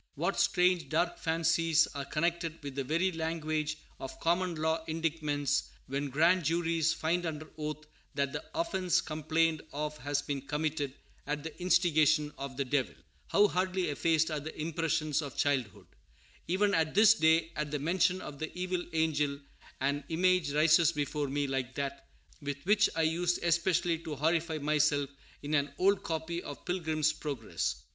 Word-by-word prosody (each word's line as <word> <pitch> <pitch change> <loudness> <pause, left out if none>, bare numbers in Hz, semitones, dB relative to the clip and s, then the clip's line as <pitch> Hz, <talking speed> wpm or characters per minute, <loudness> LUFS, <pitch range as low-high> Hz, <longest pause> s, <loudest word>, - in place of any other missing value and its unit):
What - - -1
strange, 180 -1 +2
dark 175 +2 0
fancies 165 0 +2
are 140 -1 -4
connected 165 +1 -1
with 140 -1 -5
the 135 0 -2
very 170 +7 +1
language 155 -2 -2 0.2
of 135 - -7
common 175 +1 +1
law 160 +1 0
indictments, 155 -3 -1 0.2
when 140 +1 -3
grand 170 +6 +3
juries 165 0 +1
find 170 +3 0
under 155 -2 -4
oath 155 0 -5 0.3
that 140 -1 0
the - - -4
offence 190 - +1
complained 155 0 0
of 150 0 -4
has 145 +2 -1
been 140 -2 -3
committed 150 -1 -2 0.3
"at 150 0 -2
the 160 - -7
instigation 155 -4 +3
of 135 -1 -6
the 140 - 0
Devil"! 130 0 0 0.3
How 205 +1 +5
hardly 185 -1 0
effaced 160 +2 +1
are 155 - -1
the 155 +2 -8
impressions 160 -1 0
of 140 -4 -7
childhood! 130 -8 0 0.6
Even 200 +3 +2
at 160 -1 +1
this 215 +2 +8
day, 160 -3 +3
at 150 0 -2
the 150 - -1
mention 180 +5 +1
of 145 -2 -8
the 160 - -4
evil 180 -1 -1
angel, 150 -3 +1 0.4
an 140 +2 0
image 180 -2 +2
rises 155 +2 +5
before 145 0 -2
me 145 +1 -1
like 135 -1 -3
that 140 0 -4 0.3
with 145 -1 -3
which 205 +2 +4
I 165 - +2
used 175 +2 0
especially 170 0 +2
to 160 -2 -6
horrify 160 +2 0
myself 150 -1 +1 0.3
in 145 +1 -3
an 145 -1 +2
old 195 +1 +3
copy 165 +1 -3
of 145 - -9
Pilgrim's 160 -4 0
Progress. 140 -8 -3
160 Hz, 160 wpm, -31 LUFS, 145-170 Hz, 0.6 s, this